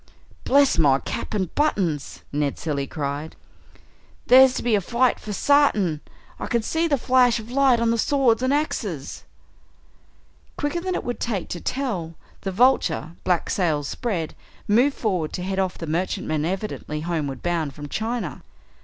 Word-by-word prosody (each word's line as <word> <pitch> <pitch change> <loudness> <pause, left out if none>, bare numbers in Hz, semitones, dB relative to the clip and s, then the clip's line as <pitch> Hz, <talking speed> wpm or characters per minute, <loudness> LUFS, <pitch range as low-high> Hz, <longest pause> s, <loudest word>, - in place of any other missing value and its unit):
"Bless 280 -8 +4
my 140 -4 +5
cap 175 - -5
and 190 -5 -2
buttons!" 185 - -1
Ned 145 -1 -1
Cilley 140 -4 -2
cried, 145 +1 -4 0.9
"there's 260 0 +7
to - - -3
be 240 - +1
a 205 - +3
fight 240 +6 +1
for 210 - -7
sartin. 210 - +2 0.4
I - - -4
can 235 -2 0
see 325 +7 0
the 290 -3 +2
flash 250 -1 +3
of 225 +2 -10
light 265 -2 +4
on 230 0 +2
the 230 - 0
swords 250 -3 +2
and 260 +1 +1
axes!" 210 - -2 1.3
Quicker 315 +4 -1
than 370 0 -2
it - - -2
would 245 - -4
take 215 -6 -2
to 175 - -5
tell, 200 -12 -3 0.3
the 195 - -3
Vulture, 185 - +2
black 180 -2 +1
sails 155 -6 0
spread, 180 - -3 0.3
moved 245 +7 +3
forward 185 -8 -1
to 180 - -4
head 190 +1 -2
off 190 -1 -1
the 165 - -5
merchantman 155 -2 -1
evidently 185 -4 -4
homeward 155 -5 -3
bound 165 -5 -1
from 145 -1 -7
China. 225 +8 -3
200 Hz, 160 wpm, -23 LUFS, 160-250 Hz, 1.3 s, there's